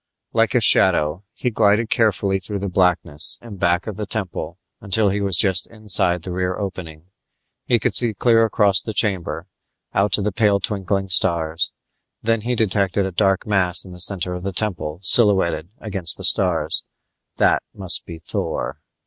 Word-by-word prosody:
Like - - +1
a - - +3
shadow 75 +6 +2
he 125 - -3
glided 110 +1 +1
carefully 100 -3 +1
through 100 +2 -5
the 100 0 -4
blackness 90 -4 -1
in 110 -4 -10
back 90 0 +1
of 110 -3 -7
the 105 -2 -5
temple 100 -5 -4 0.2
until 100 +1 0
he 100 +1 -2
was 100 -3 0
just 95 -2 +3
inside 95 -6 +1
the 90 - -6
rear 90 0 -2
opening. 90 -4 -7 0.6
He 120 - +3
could 110 - -1
see 115 -3 +2
clear 115 +1 +3
across 105 -3 +3
the 110 - -7
chamber, 95 -5 -2 0.5
out 100 - +2
into 105 - -3
the 105 - -1
pale 105 -1 +2
twinkling 95 -1 -2
stars. 85 -2 +1 0.5
Then 115 0 0
he 125 +3 -2
detected 100 -3 0
a 95 - -4
dark 95 +1 0
mass 95 -4 +2
in 95 - -12
the 90 - -9
center 90 -1 +2
of 90 - -6
the 95 +1 -5
temple 90 -7 -2
silhouetted 95 -6 +3
against 95 -6 0
the - - -10
stars; - - +2 0.5
that - - +3
must 95 -3 +2
be 85 - -10
Thor. 80 - -4
95 Hz, 175 wpm, -20 LUFS, 90-105 Hz, 0.6 s, a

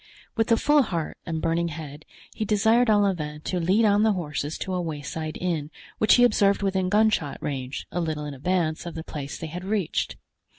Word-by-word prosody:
With 225 0 +1
a 230 - +6
full 295 +3 +4
heart 170 - -3
and 160 -2 -3
burning 165 +1 +1
head 150 -2 -8 0.3
he - - -3
desired 220 +3 +3
Olivain 180 -8 +1
to 180 +3 -2
lead 190 +7 +3
on 205 0 +4
the 220 -1 +4
horses 150 -4 -3
to 190 - -4
a 180 - 0
wayside 155 -1 -4
inn, 165 -5 -2 0.3
which 215 - +6
he 245 - +5
observed 200 -4 +3
within 190 -1 +1
gunshot 210 -8 +2
range, 135 -2 -4
a 175 - -1
little 155 -2 -2
in 145 - -5
advance 165 +3 -1
of 170 - -7
the 160 - -5
place 145 -4 -6
they - - -6
had 175 +3 -6
reached. 195 -4 -1
175 Hz, 200 wpm, -25 LUFS, 155-205 Hz, 0.3 s, a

